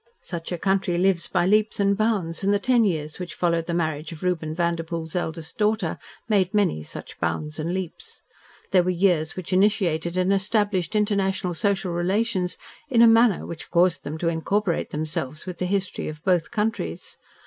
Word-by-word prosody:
Such 170 0 -6
a 175 - -1
country 190 -1 +1
lives 180 -1 +2
by - - +1
leaps 215 +3 +2
and 200 0 +3
bounds, 200 -6 0
and 200 - +3
the 205 - +4
ten 240 +3 +3
years 155 -6 -1
which 180 -1 -6
followed 170 -2 0
the 170 - -2
marriage 155 -2 -2
of 160 0 -9
Reuben 165 -4 -1
Vanderpoel's 170 -1 -2
eldest 165 0 -4
daughter 210 -5 +1 0.3
made 200 -3 +2
many 195 - +2
such 75 - -9
bounds 150 +1 -2
and 160 +2 -2
leaps. 190 - -6 0.5
They 185 - +6
were 180 - -1
years 175 -3 +2
which 185 0 -5
initiated 185 -4 +2
and 185 +2 +3
established 205 -2 0
international 195 -3 +1
social 195 0 0
relations 185 +1 0 0.3
in 235 -4 +5
a - - +9
manner 225 -3 +4
which 170 - -8
caused 175 0 +2
them 155 +2 -5
to 165 - -2
incorporate 170 +3 0
themselves 150 -1 -4
with 180 -2 -7
the 180 - -1
history 195 0 -2
of 155 0 -7
both 180 -4 +2
countries. 210 - -3
180 Hz, 180 wpm, -24 LUFS, 165-200 Hz, 0.5 s, a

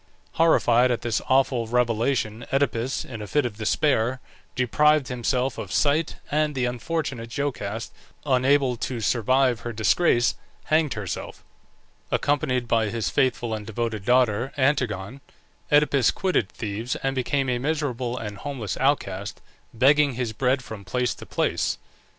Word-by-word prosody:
Horrified 125 -7 +4
at 120 -1 -1
this 115 -2 0
awful 130 -3 +2
revelation 115 -1 0
Oedipus, 130 -2 0
in 115 -4 -8
a 105 - -6
fit 145 +3 +1
of 110 -4 -4
despair, 125 +2 +1 0.4
deprived 150 +3 +3
himself 125 +2 -1
of - - -6
sight, 150 +2 +1 0.2
and 150 0 +1
the 130 -2 0
unfortunate 125 -1 -3
Jocaste, 115 -6 -3 0.3
unable 130 -1 +2
to 120 +1 -3
survive 125 +2 +2
her 120 0 -5
disgrace, 120 - +2 0.3
hanged 155 -2 +1
herself. 100 -4 -6 0.7
Accompanied 135 -4 0
by 115 -2 +2
his 110 -5 -2
faithful 120 -3 +1
and 110 -1 -4
devoted 110 -1 -3
daughter 125 +1 +2
Antigone, 130 -5 0 0.5
Oedipus 145 -3 +4
quitted 185 - 0
Thebes 110 +4 -4
and 135 0 0
became 135 +1 0
a 125 -1 0
miserable 130 -4 -2
and 105 -4 -6
homeless 120 -8 -4
outcast, 105 -8 -1 0.3
begging 140 +3 +4
his 120 -3 -2
bread 130 +3 +1
from 110 -4 -9
place 125 +6 -1
to - - -12
place. - - 0
125 Hz, 140 wpm, -24 LUFS, 115-140 Hz, 0.7 s, Horrified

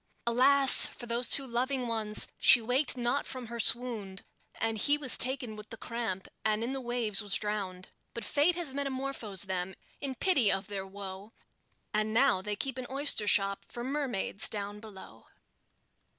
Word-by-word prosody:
Alas! 265 +3 +5
for 240 - -10
those 235 +1 +1
two 275 - +9
loving 255 +1 -2
ones! 220 -2 +1
she - - +7
waked 250 +4 -1
not 245 +3 -2
from 255 -2 -7
her 235 0 -7
swound, 225 -6 +1 0.3
And 225 -1 -3
he 290 +7 +2
was 275 -4 +5
taken 250 -3 -2
with 210 0 -12
the 225 - -9
cramp, 225 -6 -5 0.2
and 215 0 -1
in 250 +3 -4
the 270 - -5
waves 235 -4 +1
was 205 -2 -1
drowned; 195 -3 -4 0.3
But 235 -2 -6
Fate 300 +8 +2
has 340 -6 -1
metamorphosed 265 -8 -4
them, 190 0 -4 0.2
in 270 -2 -5
pity 270 - +2
of 195 +1 -2
their 195 -1 -5
woe, 195 +1 -10 0.6
And 215 +1 -1
now 250 -6 +3
they 210 +2 -4
keep 260 +4 -5
an 250 - -7
oyster 270 -6 +2
shop 195 0 +2
for 240 - -8
mermaids 260 -7 -2
down 205 -1 -5
below. 210 -3 -14
235 Hz, 170 wpm, -29 LUFS, 205-260 Hz, 0.6 s, two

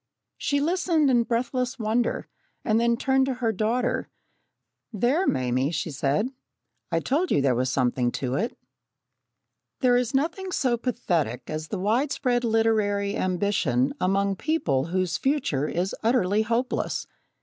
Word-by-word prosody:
She 285 - +1
listened 325 -2 +2
in 240 -2 +4
breathless 245 +2 -1
wonder, 225 +1 0 0.4
and 220 0 +3
then 235 0 +2
turned 265 +1 +2
to 265 - -1
her 240 -2 0
daughter: 220 +4 -1 0.8
"There, 245 - +1
Mame," 130 0 +1
she 160 0 -3
said, 145 - 0 0.6
"I 165 - +2
told 300 - 0
you - - +3
there 135 -2 +3
was 130 +2 0
something 125 -1 +1
in 130 -2 -2
it!" 220 - -2 1.2
There 250 -2 +4
is 245 +1 0
nothing 335 +7 -1
so 255 -8 +1
pathetic 175 - -2
as 155 0 -4
the 205 - -4
widespread 245 +4 +1
literary 215 -3 +1
ambition 180 -9 +1
among 195 +1 +1
people 155 - 0
whose 180 0 -1
future 265 - 0
is 180 +4 -2
utterly 220 -3 +2
hopeless. 235 +3 -1
220 Hz, 140 wpm, -25 LUFS, 165-255 Hz, 1.2 s, in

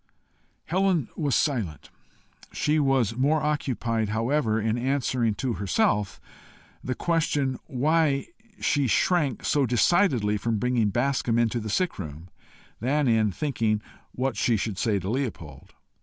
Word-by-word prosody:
Helen 185 -5 +1
was 145 -4 0
silent. 110 - -1 0.6
She 150 +1 +1
was 135 -6 +2
more 145 +5 +2
occupied 120 -7 -1
however 115 +1 0
in 110 +1 0
answering 125 -3 0
to 130 +2 -2
herself 100 0 0 0.6
the 130 - -2
question 150 -6 0
why 145 0 +1 0.3
she 145 -3 +1
shrank 145 - +1
so 140 -3 +2
decidedly 120 - +2
from 115 +2 -1
bringing 120 -2 +1
Bascombe 120 +1 0
into 120 0 +1
the 110 -1 -5
sick 180 - -1
room, 80 0 -8 0.5
than 140 +5 +1
in 110 -3 +3
thinking 110 - -1 0.3
what 130 -1 -2
she 115 +2 +2
should 100 -2 -3
say 110 -3 +1
to 95 -1 -5
Leopold. 95 - -4
125 Hz, 130 wpm, -26 LUFS, 110-145 Hz, 0.6 s, in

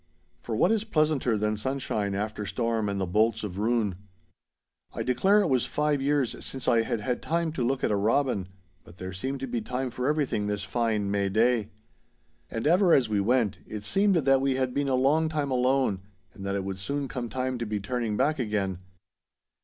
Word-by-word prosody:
For - - -4
what - - +3
is 220 -2 +1
pleasanter 155 - +1
than 105 +1 0
sunshine 105 -4 -2
after 105 +1 -3
storm 115 0 -1
and 100 0 -2
the 95 - 0
bolts 110 +6 +1
of 100 -2 -5
ruin. 110 -2 +1 1.0
I - - -2
declare 190 +12 +3
it - - +1
was 130 -3 +1
five 150 -2 0
years 140 -3 0
since 130 -2 -6
I 115 - +4
had 110 -1 -2
had 125 +2 -2
time 165 0 0
to 140 -5 -2
look 130 +2 0
at - - +2
a - - +2
robin. 110 -1 +1 0.4
But 85 - -16
there 95 0 -6
seemed 130 +8 -4
to 135 - -3
be 120 -2 -2
time 125 +3 -3
for 125 +2 -2
everything 145 -9 0
this 105 -1 -2
fine 105 -1 0
May 100 -1 +1
day. 110 +1 +2 0.8
And 115 - -4
ever 175 +2 +5
as 125 -5 +2
we 105 -1 +1
went, 115 -1 +1
it 105 -1 -6
seemed 195 - +2
that 135 -4 +3
we 135 -1 +1
had 130 -1 -1
been 140 -1 0
a 130 - +2
long 150 +5 +3
time 150 -3 -2
alone, 125 -5 +2 0.3
and 95 - -10
that 100 - -1
it 100 - -1
would 95 0 -5
soon 140 +8 -2
come 125 -2 -4
time 130 0 -2
to 115 - -3
be 105 -1 -2
turning 110 0 -2
back 145 +3 +1
again. 100 -6 -1
120 Hz, 210 wpm, -27 LUFS, 105-135 Hz, 1.0 s, ever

